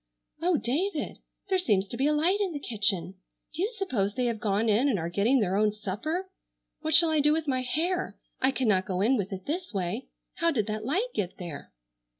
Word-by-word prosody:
"Oh, 350 -1 +3
David! 305 +7 -1 0.3
There 380 -1 +3
seems 205 - +2
to - - -4
be 270 +4 +1
a - - +3
light 335 +7 +2
in 380 -4 0
the 290 - -3
kitchen! 195 -7 -1 0.3
Do 320 - -3
you 405 - +2
suppose 260 - -1
they 250 -1 0
have 230 -2 -1
gone 210 +1 +1
in 225 +7 +3
and 230 - +2
are 170 0 -3
getting 225 +9 +3
their 190 -2 +1
own 210 +1 +3
supper? 220 - -3 0.5
What 315 -1 +2
shall 335 -1 +6
I 310 - +3
do 295 +1 +4
with 320 -1 -1
my 260 -2 +1
hair? 340 +9 -1 0.2
I 260 - +4
cannot 215 -8 +1
go 185 -2 -1
in 240 +6 +4
with 200 -4 -2
it 190 -1 -6
this 340 - -4
way. 190 +6 -2 0.3
How 335 0 +3
did 235 -10 +1
that 215 0 -4
light 380 - 0
get 185 -3 -3
there?" 165 -6 -8
250 Hz, 220 wpm, -28 LUFS, 200-320 Hz, 0.5 s, shall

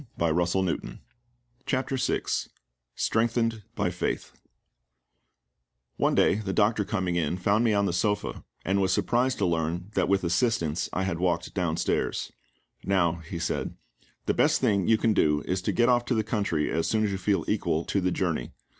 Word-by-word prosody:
CHAPTER 135 +1 0
VI 130 0 0 0.7
STRENGTHENED 115 0 +1
BY - - 0
FAITH - - -3 1.7
ONE - - +2
day - - +4
the 105 -3 -3
doctor 105 +2 +2
coming 95 -4 -1
in 85 +1 0
found 100 +5 +2
me 115 -2 +3
on 100 0 +2
the 95 - 0
sofa, 105 +3 -1 0.2
and 100 +1 +1
was 95 0 +2
surprised 125 +7 +1
to 100 - +1
learn 85 +3 -1
that 95 -4 +1
with 100 -1 +2
assistance 85 -4 0
I 95 - -1
had 90 -3 -2
walked 85 -1 0
downstairs. 85 -4 -1 0.5
"Now," 85 -4 +2
he 85 - -4
said, 85 - -2 0.5
"the - - +1
best - - +3
thing 100 -4 +1
you 110 - +5
can 110 0 +2
go 75 -6 +2
is 95 0 -1
to - - -1
get 120 0 +3
off 120 -1 +3
to 125 - 0
the 110 - +1
country 100 -8 -1
as 80 0 0
soon 110 -1 +1
as 105 - 0
you 95 - -3
feel 100 +1 0
equal 80 +2 0
to 100 - 0
the 90 - +1
journey. 85 -9 -2
95 Hz, 170 wpm, -27 LUFS, 85-110 Hz, 1.7 s, you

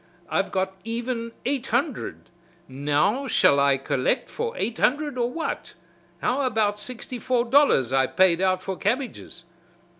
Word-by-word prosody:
I've - - 0
got 190 0 -1
even 230 +1 -3
eight 265 -1 -1
hundred, 255 - -2 0.4
now 150 - 0
shall 140 - +4
I 140 -1 +4
collect 135 - -1
for 470 +1 -4
eight 230 - -2
hundred 295 +1 +1
or 240 -1 0
what, 325 +4 -4 0.5
how 260 +3 +1
about 215 -5 +1
sixty 250 +2 -6
four 245 +1 +1
dollars 235 - +4
I 135 -1 +3
paid 185 -2 +3
out 185 -1 +1
for 190 - -3
cabbages." 245 +5 -3
230 Hz, 145 wpm, -25 LUFS, 185-255 Hz, 0.5 s, shall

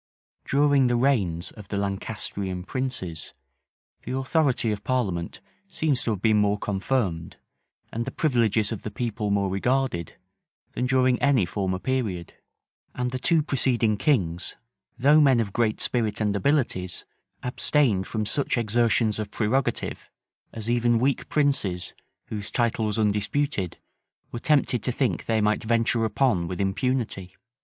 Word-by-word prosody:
} - - -54
During 140 -2 +3
the 120 - +2
reigns 105 -10 +1
of 105 -3 -12
the 100 - -3
Lancastrian 100 -2 -3
princes, 95 -9 -4 0.7
the 130 - -4
authority 135 -4 +1
of 105 -1 -4
parliament 95 -10 -2 0.3
seems 155 -8 0
to - - -2
have 105 -4 -2
been 110 -1 +4
more 105 0 +2
confirmed, 100 -4 -2 0.6
and 115 - -1
the - - -3
privileges 115 -8 +1
of 110 - -4
the - - -5
people 110 -2 -3
more 100 -1 +1
regarded, 120 - -1 0.6
than 125 - -1
during 130 -1 +2
any 140 -8 +4
former 95 0 -2
period; 105 -7 -2 0.6
and 125 0 -1
the 130 - -3
two 160 +3 +3
preceding 120 -6 +1
kings, 95 - 0 0.4
though 145 +5 +5
men 135 -4 +5
of 100 -4 -2
great 115 -2 +1
spirit 115 -4 0
and 105 -2 0
abilities, 100 - 0 0.4
abstained 125 -5 +1
from 110 -1 -2
such 140 +4 0
exertions 115 -1 +2
of 105 -1 -3
prerogative, 120 +6 -1 0.4
as 110 -1 -6
even 120 0 +2
weak 130 +3 0
princes, 135 -12 0 0.4
whose 105 -1 -4
title 115 -2 0
was 105 - -2
undisputed, 105 - 0 0.5
were 120 - -4
tempted 140 -4 +2
to 125 - 0
think 130 0 -1
they 110 -1 +2
might 105 +1 +1
venture 115 0 +2
upon 110 -7 +1
with 90 0 -5
impunity. 100 -2 -1
115 Hz, 145 wpm, -25 LUFS, 100-130 Hz, 0.7 s, though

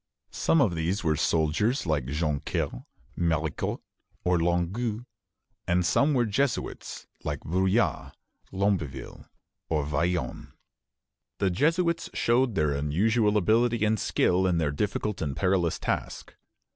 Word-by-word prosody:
Some 165 - +2
of 105 -10 +3
these 85 +5 -1
were 80 -2 +2
soldiers, 85 - +1
like 75 -6 0
Joncaire, 75 -4 -2 0.3
Maricourt, 80 -3 -1 0.4
or 90 -1 +2
Longueuil, 95 +8 -1 0.6
and 90 0 +2
some 140 - +3
were 120 -2 +3
Jesuits, 120 +4 -2 0.2
like 75 -2 -3
Bruyas, 95 - 0 0.4
Lamberville, 95 -9 -2 0.4
or 75 -3 0
Vaillant. 85 +4 -2 0.8
The 95 - +1
Jesuits 165 - +1
showed 120 -1 +2
their 75 -3 +1
usual 105 +7 +2
ability 110 +2 +2
and 110 0 +1
skill 95 +1 +2
in 90 -2 +1
their 80 -3 +1
difficult 105 +5 -2
and 70 -4 -2
perilous 90 -1 +1
task. - - -4
90 Hz, 120 wpm, -27 LUFS, 80-110 Hz, 0.8 s, of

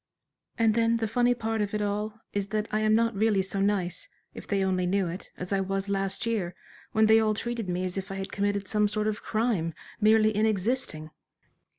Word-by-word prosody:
"And 225 -2 +4
then 230 +1 +3
the 225 -1 -1
funny 245 +2 +2
part 225 -2 -1
of 205 0 -2
it 210 - -1
all 210 +2 -3
is 200 -1 -1
that 215 +1 -2
I 215 - +1
am 215 0 +3
not 230 -1 +2
really 205 -1 +2
so 195 +1 -3
nice, 195 -3 0 0.2
if - - -10
they 200 -1 +1
only 185 -1 +1
knew 190 0 +1
it, 170 +3 -7
as 180 +2 -4
I 195 - +2
was 195 +1 -2
last 195 +2 -1
year, 200 -6 -1 0.4
when 220 0 +4
they 220 +1 +6
all 215 -1 +2
treated 235 -3 -3
me 180 +1 -1
as 185 +1 -2
if 190 - -7
I - - -4
had 195 0 -5
committed 200 -1 -1
some 210 0 +2
sort 210 +1 -1
of 215 0 -1
crime, 215 -8 0 0.2
merely 215 0 +4
in 215 +1 +3
existing." 200 -7 -1
210 Hz, 220 wpm, -28 LUFS, 195-220 Hz, 0.4 s, they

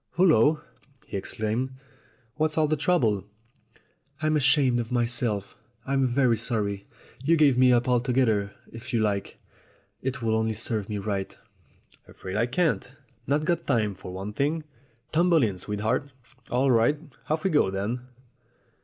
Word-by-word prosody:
"Hul 185 +1 +4
lo!" 150 +5 +4 0.4
he - - -8
exclaimed. 110 +6 -2 0.6
"What's 155 +1 -1
all 155 -1 +4
the 155 - +1
trou 180 +5 +2
ble?" 105 - +1 1.0
"I'm 155 0 +1
ashamed 135 -3 +3
of 115 0 -4
myself. 120 -4 0 0.3
I'm 135 -1 +1
very 125 -2 +2
sorry. 105 -3 -2 0.4
You 160 +4 +3
may - - +4
give 145 -4 +5
me 125 0 +5
up 120 0 +3
altogether 120 -5 +2 0.2
if 120 +3 -8
you 115 - +2
like. 100 -2 -1 0.6
It 125 -2 -3
would 110 -1 +1
only 110 0 0
serve 110 -1 -2
me 105 - -2
right." 100 -1 -3 0.7
"Afraid 95 +1 -8
I 115 +3 +2
can't. 150 -2 0 0.3
Not 150 +2 +1
got 170 0 -1
time, 110 -6 +1
for 95 -1 -9
one 95 +3 -6
thing. 150 +7 0 0.5
Tumble 170 -2 +4
in, 100 -5 -1
sweetheart. 105 +8 -1 0.4
All 130 +2 +2
right? 120 +5 +3 0.3
Off 155 +1 0
we 190 - +1
go 150 -11 +3
then." 100 +6 -2
120 Hz, 155 wpm, -26 LUFS, 105-145 Hz, 1.0 s, give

